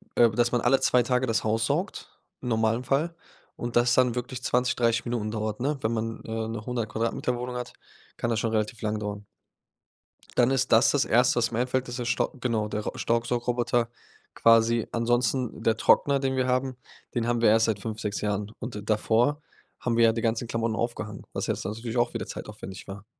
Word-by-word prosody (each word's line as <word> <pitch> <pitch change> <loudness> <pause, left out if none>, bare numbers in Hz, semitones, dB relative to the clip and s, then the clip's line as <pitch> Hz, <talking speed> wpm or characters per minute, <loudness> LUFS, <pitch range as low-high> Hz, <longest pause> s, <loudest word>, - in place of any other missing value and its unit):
ähm, 115 -3 +4
dass 120 0 +2
man 120 - +1
alle 130 +2 +4
2 125 -1 +3
Tage 125 +1 +1
das 115 -1 +1
Haus 110 +1 +1
saugt 170 - -2 0.3
im 125 - -4
normalen 110 +1 +1
Fall 150 +7 0 0.4
und 120 0 -4
das 120 0 +4
dann 125 -2 +3
wirklich 125 +1 -4
20, 125 0 +1
30 115 0 +2
Minuten 115 -3 -2
dauert, 110 0 -3
ne? 145 +3 0
Wenn 110 +1 0
man 115 0 -3
äh 110 - -8 0.2
'ne 110 -1 -5
100 120 -3 -2
Quadratmeter-Wohnung 120 +2 -2
hat, 125 - -6 0.4
kann 120 - -1
das 115 - +1
schon 115 -1 -1
relativ 110 +1 -1
lang 105 0 -1
dauern. 105 -1 -5 1.1
Dann 125 +1 +4
ist 135 0 +1
das 115 +4 +6
das 145 - +2
Erste, 125 +1 +3
was 115 -1 +2
mir 115 - -1
einfällt 130 +1 0
ist 120 +1 -5
der 120 - -3
Stau, 115 - 0
genau, 115 -4 0
der 105 0 -2
Staubsaugroboter 120 0 0 0.5
quasi. 115 0 +4
Ansonsten 120 +1 0
der 115 - +3
Trockner, 140 +4 +4
den 135 -1 -1
wir 130 -1 +1
haben. 130 0 0 0.4
Den 115 -1 0
haben 120 -1 +1
wir 115 - +6
erst 110 +1 +5
seit 110 -3 0
5, 110 +1 -5
6 105 -2 -3
Jahren. 105 0 -2
Und 105 -4 -6
davor 115 +7 +2 0.4
haben 120 -2 -1
wir 115 - +6
ja 115 - +4
die 115 - -2
ganzen 115 +1 0
Klamotten 115 -1 -1
aufgehangen, 105 -3 -4
was - - -2
jetzt - - -2
natürlich 115 +3 -4
auch 120 0 +2
wieder - - -4
zeitaufwendig 95 +1 -8
war. 100 +1 -8
115 Hz, 205 wpm, -27 LUFS, 110-125 Hz, 1.1 s, das